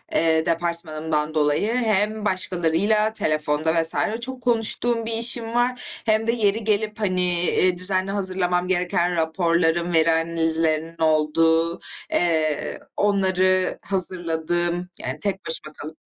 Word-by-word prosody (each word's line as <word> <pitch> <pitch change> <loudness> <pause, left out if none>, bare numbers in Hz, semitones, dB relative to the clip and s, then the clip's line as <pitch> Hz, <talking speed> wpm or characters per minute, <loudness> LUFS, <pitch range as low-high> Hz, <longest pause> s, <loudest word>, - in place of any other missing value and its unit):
eee, 160 -1 +2
departmanımdan 160 -2 -2
dolayı 150 +7 +1
hem 215 -2 0
başkalarıyla 185 +3 0
telefonda 155 -1 0
vs. 165 - +3 0.3
çok 260 +1 -6
konuştuğum 230 0 +1
bir 230 - -2
işim 230 0 0
var, 250 +1 -1
hem 220 0 +1
de 230 - +3
yeri 220 -1 0
gelip, 215 +1 -1
hani, 180 -4 +1
eee, 185 +1 +2
düzenli 185 +1 0
hazırlamam 185 -2 0
gereken 175 -1 0
raporlarım, 170 +1 0
veri 165 0 +4
analizlerinin 165 0 -1
olduğu, 160 +2 +2 0.3
eee, 160 -3 0 0.2
onları 185 -2 +1
hazırladığım, 175 -1 0
yani 130 +4 -4
tek 200 -1 -3
başıma 160 -2 -3
kalıp 155 +2 -9
175 Hz, 120 wpm, -22 LUFS, 160-205 Hz, 0.3 s, veri